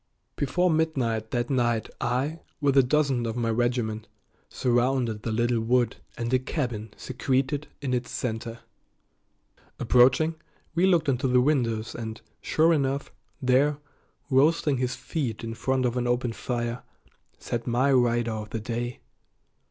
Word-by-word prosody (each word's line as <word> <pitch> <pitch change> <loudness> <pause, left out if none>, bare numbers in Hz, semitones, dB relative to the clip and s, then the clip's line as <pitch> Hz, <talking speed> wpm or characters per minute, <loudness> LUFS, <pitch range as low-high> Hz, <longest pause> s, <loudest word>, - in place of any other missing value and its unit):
Before 175 +6 +1
midnight 130 -9 0
that 120 +2 -1
night 120 -4 +1
I, 135 +7 -1 0.2
with 140 -2 +2
a 135 - +8
dozen 135 -2 +1
of 115 - -3
my 115 -2 0
regiment, 115 -2 -1 0.4
surrounded 120 -2 +1
the 115 - -3
little 120 +1 +1
wood 120 +1 +1 0.2
and 115 +1 -2
a 130 - +5
cabin 120 -5 -3
secreted 130 +3 -1 0.2
in 130 -2 -1
its 125 0 -1
center. 115 -1 -4 1.2
Approaching, 130 +7 +4 0.4
we 175 +3 +3
looked 170 -5 +3
into 130 0 +1
the 125 0 +4
windows, 120 -5 +1
and, 110 -1 -6 0.2
sure 165 +2 +3
enough, 140 -2 -1 0.3
there, 135 +3 +3 0.5
roasting 145 +1 +3
his 125 0 -1
feet 130 -11 -4
in 115 0 -4
front 130 +3 0
of 120 0 0
an 125 -1 0
open 120 -1 0
fire, 120 0 -3 0.6
sat 120 0 -4
my 125 +4 +2
rider 120 -2 +2
of 110 -1 -5
the 115 - -3
day. 120 +2 -4
125 Hz, 145 wpm, -26 LUFS, 115-135 Hz, 1.2 s, a